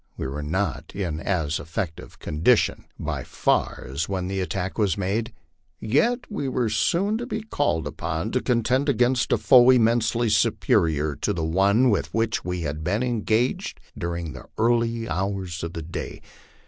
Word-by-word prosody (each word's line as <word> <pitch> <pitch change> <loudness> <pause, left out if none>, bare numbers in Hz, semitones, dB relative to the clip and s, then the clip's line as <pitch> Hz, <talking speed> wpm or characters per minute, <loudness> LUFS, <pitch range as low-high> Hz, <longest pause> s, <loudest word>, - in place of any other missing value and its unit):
We - - -4
were 70 +3 -4
not 95 +7 -2
in 85 -6 -2
as 80 -4 -1
effective 80 +1 -5
condition 85 +11 +1
by - - -3
far - - 0
as 70 +7 -3
when 95 -2 -2
the 95 +1 -2
attack 95 +2 -3
was 100 -6 +2
made, 105 +5 -1 0.5
yet 230 - +2
we 205 -10 -3
were 125 -3 0
soon 185 - +1
to 240 - -5
be 220 -4 -3
called 145 - 0
upon 80 +7 -3
to 125 - 0
contend 125 +3 +1
against 125 -1 +2
a - - +4
force 130 -1 +7
immensely 115 0 +2
superior 75 -7 +2
to - - -1
the 85 -2 -2
one 100 +9 +3
with 100 - -1
which 115 -1 0
we 90 -1 -3
had 75 0 -4
been 100 +9 0
engaged 120 0 0 0.2
during 85 -3 -4
the 65 - -11
early 115 0 +1
hours 95 -1 -3
of 85 0 -4
the 80 - -5
day. 85 - -6
100 Hz, 165 wpm, -24 LUFS, 85-120 Hz, 0.5 s, force